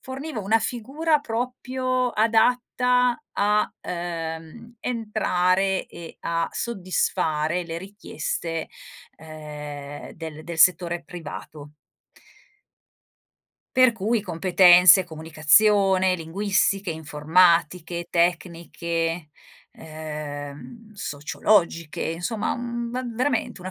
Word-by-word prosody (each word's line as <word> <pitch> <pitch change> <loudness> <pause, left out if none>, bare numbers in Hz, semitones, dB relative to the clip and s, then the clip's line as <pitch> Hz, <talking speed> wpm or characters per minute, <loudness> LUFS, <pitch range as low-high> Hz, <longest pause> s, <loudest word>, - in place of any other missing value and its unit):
forniva 265 -1 -6
una 220 +3 +2
figura 285 +8 0
proprio 255 +1 -2
adatta 245 +2 +2 0.2
a, 210 +1 +1 0.2
uhm, 170 +5 -6
entrare, 195 -5 0
e 170 -1 -11
a 165 0 -1
soddisfare 175 -5 -1
le 165 0 -5
richieste, 170 -4 -5 0.5
uhm, 150 -2 -9
del 160 -1 -8
del 170 -1 -7
settore 175 0 +3
privato. 150 -3 -9 2.0
Per 255 -2 +6
cui 225 +2 0
competenze, 180 0 +6
comunicazione, 185 +5 +3
linguistiche, 195 +2 0
informatiche, 165 +2 +1
tecniche, 170 -1 -1 0.5
uhm, 155 +6 -8
sociologiche, 170 -1 0
insomma, 175 +7 -2
mhmm, 235 -1 -4
v 250 -2 -4
veramente 250 -6 -1
una 185 - -6
180 Hz, 80 wpm, -24 LUFS, 160-225 Hz, 2.0 s, Per